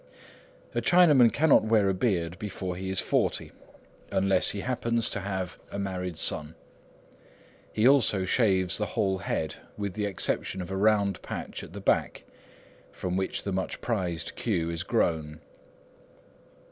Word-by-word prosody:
A - - 0
Chinaman 150 -10 +6
cannot 155 0 +4
wear 110 -2 +3
a 95 - +2
beard 90 -4 -1
before 95 -4 -4
he 95 +1 -5
is 95 - +1
forty, - - 0 0.6
unless 95 0 +2
he 100 - -3
happens 115 -2 0
to 100 - -2
have 95 -2 -4
a - - -5
married 90 -3 -4
son. 80 -1 0 1.2
He 110 +3 +3
also 120 -8 +4
shaves 95 -3 +2
the 105 - -1
whole 95 -1 +1
head 80 -5 -3 0.2
with 100 -2 -3
the 105 +1 -2
exception 95 0 -1
of 90 0 -6
a - - -2
round 100 -2 +2
patch - - -5
at - - -11
the 100 - -7
back, - - 0 0.7
from 90 -1 -4
which 95 0 -2
the 100 - -3
much 95 0 -2
prized 90 -8 -3
queue 85 0 -1
is 85 0 -3
grown. 80 -7 -1
95 Hz, 150 wpm, -27 LUFS, 90-105 Hz, 1.2 s, Chinaman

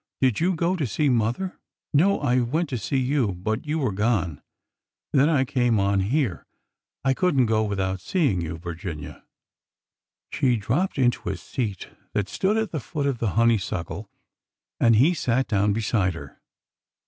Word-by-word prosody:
" - - -67
Did 130 -5 +2
you 180 +2 +2
go 170 +3 +1
to 155 -7 -1
see 145 +7 +1
mother? 120 - 0
" - - -66
" - - -57
No. 185 +8 +4
I 130 -3 +2
went 145 +7 0
to 125 - -2
see 115 +6 -1
you, 130 -5 +1
but 110 +9 -3
you 155 +2 0
were 130 -8 0
gone. 100 - 0 0.7
Then 140 +3 +4
I 140 -5 +3
came 120 -4 +1
on 100 0 +2
here. 115 - -1 0.6
I 135 - +4
could 180 -2 +1
n't 125 - +5
go 110 -1 +2
without 95 -3 -2
seeing 130 - +1
you, 80 0 -4
Vir 85 +1 -6
ginia." 80 -4 -7 1.1
She 125 -2 +2
dropped 135 - -1
into 125 -5 +1
a 95 - -3
seat 100 +1 -4 0.2
that 100 -1 -1
stood 200 - +1
at 220 -2 -1
the 155 - -2
foot 145 +3 -4
of 135 -4 -1
the 110 -5 -1
honeysuckle, 105 -3 0 0.7
and 115 -1 +5
he 140 +11 +5
sat 130 -5 0
down 105 0 +2
beside 100 -4 0
her. 75 -4 -11
120 Hz, 185 wpm, -24 LUFS, 100-140 Hz, 1.1 s, n't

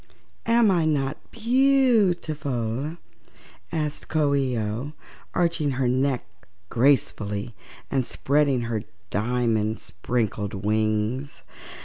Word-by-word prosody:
"Am 230 -2 +5
I 170 -3 +2
not 145 -2 0
beautiful?" 175 - +1 0.7
asked 150 -2 -2
Coo 150 -2 +2
ee 135 -3 +1
oh, 110 +7 -3 0.4
arching 165 -5 +1
her 130 -2 +1
neck 130 +1 +1 0.4
gracefully 115 -4 +1 0.4
and 135 -2 +2
spreading 140 0 +1
her 115 -2 -2 0.3
diamond 110 0 +1
sprinkled 105 +2 -2
wings. 110 +5 0
135 Hz, 90 wpm, -25 LUFS, 110-155 Hz, 0.7 s, Am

